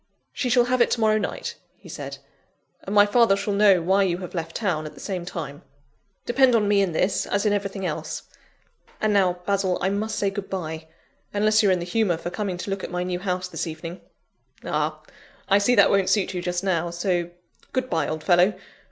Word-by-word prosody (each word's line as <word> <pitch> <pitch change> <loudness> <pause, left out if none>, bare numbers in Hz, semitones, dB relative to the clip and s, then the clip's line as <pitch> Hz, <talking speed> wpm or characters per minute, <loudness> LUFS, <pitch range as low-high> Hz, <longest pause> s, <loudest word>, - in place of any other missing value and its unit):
"She 250 - -2
shall 245 0 +4
have 250 0 +1
it - - +4
to - - -2
morrow 215 -1 +3
night," 200 - -4 0.2
he - - -17
said, - - -7 0.6
"and 200 - -5
my 205 0 +8
father 225 -1 +4
shall 200 +1 -2
know 200 -4 +5
why 190 +3 +3
you 180 -3 +1
have 180 -1 -8
left 165 -2 -4
town, 170 -8 -1
at - - -11
the - - -13
same 185 -4 -4
time. 150 -5 -6 0.6
Depend 250 0 +4
on 210 -2 +2
me 205 -1 +4
in 190 -3 +1
this, 185 +4 0
as 200 +1 0
in 210 - +3
everything 200 -1 -3
else. - - -4 0.8
And 215 -1 +1
now, 180 -3 +2
Basil, 195 -2 +1
I 190 - +1
must 210 +2 -2
say 200 -1 +1
good 195 0 -6
bye 160 -4 -5 0.5
unless 215 +2 +4
you're 200 -3 +4
in 185 - +3
the 175 - -4
humour 180 -2 +1
for 175 - -5
coming 190 -1 -3
to 195 - -5
look 195 -1 -3
at - - -4
my 180 0 -2
new 180 0 -2
house 185 -1 -2
this 180 - -4
evening. 165 +2 -7 0.6
Ah! - - -2 0.4
I 200 0 +5
see 245 +5 +3
that 200 -3 +6
won't 195 -2 +2
suit 200 -2 +1
you 180 - -3
just 175 +1 -2
now, 175 -3 0
so, 175 0 -1 0.4
good 260 -1 -1
bye, 160 - 0
old 155 0 -4
fellow! 180 +2 +4
195 Hz, 220 wpm, -24 LUFS, 175-205 Hz, 0.8 s, my